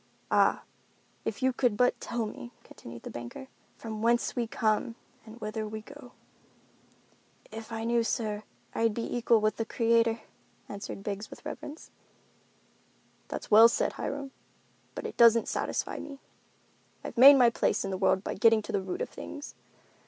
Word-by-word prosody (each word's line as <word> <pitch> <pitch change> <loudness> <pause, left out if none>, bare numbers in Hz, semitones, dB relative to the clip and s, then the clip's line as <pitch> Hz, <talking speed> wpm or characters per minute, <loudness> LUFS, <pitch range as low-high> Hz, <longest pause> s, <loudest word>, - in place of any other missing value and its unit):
"Ah, - - +3 0.6
if - - -3
you 260 0 +3
could 245 -4 +1
but 250 +2 +2
tell 235 -1 -2
me," 240 +3 -8
continued 115 0 -12
the - - -7
banker, 120 - -8 0.3
"from 220 -2 -6
whence 235 +1 +1
we 240 -2 -1
come, 220 +1 0 0.3
and 220 +2 -11
whither 215 0 -4
we 215 +1 -6
go?" 275 +1 -13 1.4
"If 225 +1 -8
I 225 0 -4
knew, 235 +1 +2
sir, 215 -3 -2 0.3
I'd 225 -2 +1
be 230 - -3
equal 235 -2 +3
with 215 0 +1
the 225 - 0
Creator," 230 -1 +2 0.5
answered 200 -1 -7
Biggs 205 +1 -4
with - - -13
reverence. 300 +3 -8 1.4
"That's - - -7
well 220 +2 +9
said, 235 - 0
Hiram, 280 -1 -5 0.6
but - - -6
it - - -6
doesn't 230 -1 +6
satisfy - - -2
me. 280 -2 -8 0.9
I've - - -7
made 270 +4 +10
my 245 -3 +5
place 230 - 0
in 195 - -3
the - - -1
world 190 0 +2
by - - -3
getting 225 +1 +4
to - - -6
the 200 - 0
root 185 -1 -4
of - - -6
things. 290 - -8
225 Hz, 165 wpm, -29 LUFS, 215-240 Hz, 1.4 s, made